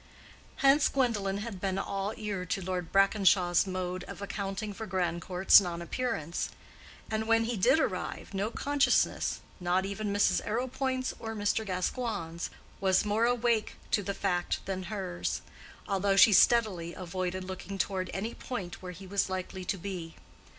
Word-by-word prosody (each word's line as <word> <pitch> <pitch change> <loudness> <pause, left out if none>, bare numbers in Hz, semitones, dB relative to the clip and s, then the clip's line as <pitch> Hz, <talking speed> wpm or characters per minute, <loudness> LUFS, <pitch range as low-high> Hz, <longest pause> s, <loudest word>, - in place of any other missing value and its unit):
Hence 275 +2 +5
Gwendolen 210 -7 0
had 210 -5 -6
been 190 -1 -1
all 195 +2 -2
ear 205 -4 -3
to 180 - -2
Lord 180 -2 -3
Brackenshaw's 195 -2 +4
mode 185 -1 -3
of - - -9
accounting 200 +1 -4
for 220 +2 -6
Grandcourt's 180 +1 +4
non 175 -2 -4
appearance; 170 -4 -2 0.6
and 220 0 -1
when 225 0 +4
he 235 +1 -1
did 210 +10 +4
arrive, 190 -6 -2
no 200 +2 -1
consciousness—not 190 -9 +1
even 200 +1 -3
Mrs. 205 0 +3
Arrowpoint's 255 +3 -1
or 225 0 -5
Mr. 205 +1 0
Gascoigne's—was 190 -2 -2
more 210 +2 +2
awake 235 -2 +1 0.2
to 205 - +3
the 200 0 -3
fact 180 -3 -1
than 190 -1 -3
hers, 185 -4 -3 0.4
although 195 0 +1
she 205 +2 +8
steadily 190 -7 +4
avoided 185 0 -3
looking 190 +1 -6
toward 185 -1 -1
any 215 +4 -3
point 200 -9 -6
where 180 -1 -6
he 190 +2 -11
was 195 0 0
likely 185 0 -4
to 195 - -1
be. 175 -3 -6
195 Hz, 145 wpm, -30 LUFS, 185-220 Hz, 0.6 s, she